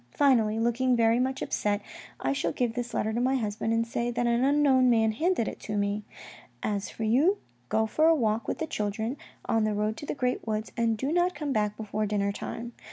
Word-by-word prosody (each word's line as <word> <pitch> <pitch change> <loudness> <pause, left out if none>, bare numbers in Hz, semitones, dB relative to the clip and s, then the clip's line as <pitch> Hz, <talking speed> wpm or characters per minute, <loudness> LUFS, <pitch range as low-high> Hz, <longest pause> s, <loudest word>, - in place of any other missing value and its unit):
Finally, 230 -6 +3
looking 240 +2 +2
very 230 0 +3
much 260 +1 -1
upset, 205 -1 0 0.4
I - - 0
shall 270 - -1
give 240 -3 -1
this 240 0 -4
letter 220 +1 -1
to 235 - 0
my 260 +2 +2
husband 220 -2 -2
and 230 0 +2
say 235 +1 -2
that 240 0 -1
an 235 +1 +2
unknown 275 -2 +4
man 225 -2 +3
handed 310 +1 0
it - - -5
to 210 -1 -4
me. 205 +1 -1 0.6
As 205 -2 -1
for 225 - -6
you, 280 - +3 0.3
go 220 - +2
for 310 +9 +2
a 330 - +6
walk 225 -5 0
with - - -2
the 320 - -2
children, 220 0 -2 0.3
on 225 -1 +1
the 215 -1 0
road 210 +1 0
to 290 - -8
the - - -2
great 250 -3 -1
woods, 215 0 -2
and 230 -1 +1
do 270 +6 -2
not 355 +2 +2
come 295 -3 -2
back 210 -2 0
before 215 0 -2
dinner 200 -1 0
time. 235 +3 -6
230 Hz, 225 wpm, -28 LUFS, 215-260 Hz, 0.6 s, a